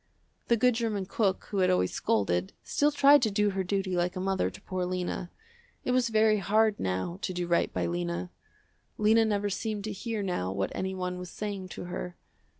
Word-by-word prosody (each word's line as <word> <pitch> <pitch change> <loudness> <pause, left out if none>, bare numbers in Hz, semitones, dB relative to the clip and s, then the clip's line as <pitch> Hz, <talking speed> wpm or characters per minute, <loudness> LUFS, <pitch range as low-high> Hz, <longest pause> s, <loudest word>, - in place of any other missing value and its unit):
The 235 - +4
good 250 +3 +4
german 220 -4 -1
cook 195 0 0
who 200 - 0
had 185 -1 +4
always 180 - +2
scolded, 95 -4 0
still 290 - +2
tried 285 0 +6
to 225 - +2
do 205 0 +2
her 190 0 -1
duty 190 0 -1
like 175 0 0
a - - -3
mother 190 0 0
to - - -13
poor 185 -1 -3
Lena. 180 0 -3 0.6
It - - +1
was 250 -2 +2
very 215 -1 +4
hard 215 +1 +2
now 95 - -2
to 190 - -2
do 175 0 -2
right 170 0 +1
by 90 -1 -1
Lena. 85 +1 -2 0.7
Lena 220 +2 +4
never 205 -1 0
seemed 215 0 -3
to 215 - -3
hear 215 +1 -3
now 95 - -1
what 95 0 -2
anyone 185 -1 -3
was 180 0 -7
saying 200 -2 -5
to - - -5
her. 180 0 -6
190 Hz, 200 wpm, -29 LUFS, 175-215 Hz, 0.7 s, tried